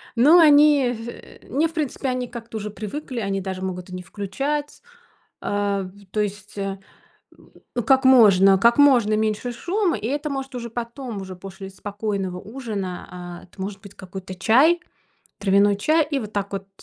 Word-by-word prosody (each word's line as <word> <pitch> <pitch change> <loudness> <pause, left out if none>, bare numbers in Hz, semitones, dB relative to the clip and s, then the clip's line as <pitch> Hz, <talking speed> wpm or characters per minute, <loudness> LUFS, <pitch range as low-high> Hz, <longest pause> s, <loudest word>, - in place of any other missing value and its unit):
Но 300 +9 +7
они 290 -4 +6
в 230 +1 -10
не 300 +6 +2
в 325 - -14
принципе 290 -3 -2
они 250 -1 -2
как-то 230 -2 -8
уже 210 0 -4
привыкли, 235 +5 -6
они 195 -2 -2
даже 190 0 -5
могут 180 -1 -5
и 180 - -7
не 180 - -7
включать. 275 - -4 0.6
Э, 205 -1 -1
в 195 +2 -12
то 215 - -2
есть, 205 0 -5
э, 195 -1 -3 1.1
как 265 0 +4
можно 195 -7 +7
как 235 +6 +4
можно 245 -7 +5
меньше 215 +3 -1
шума, 365 - 0
и 215 - -5
это, 290 +3 -2
может, 270 -1 -5
уже 235 -2 -5
потом, 235 -2 -5
уже 185 -1 -8
после 195 +1 -9
спокойного 200 -2 -4
ужина, 205 -6 -5
а, 175 -1 -8
это 185 +1 -16
может 195 0 -5
быть 200 -1 -13
какой-то 185 0 -8
чай, 280 - +4 0.6
травяной 200 +1 +4
чай. 310 +7 +3
И 280 - +1
вот 215 -4 -7
так 200 0 -2
вот, 195 0 -5
215 Hz, 170 wpm, -23 LUFS, 195-265 Hz, 1.1 s, Но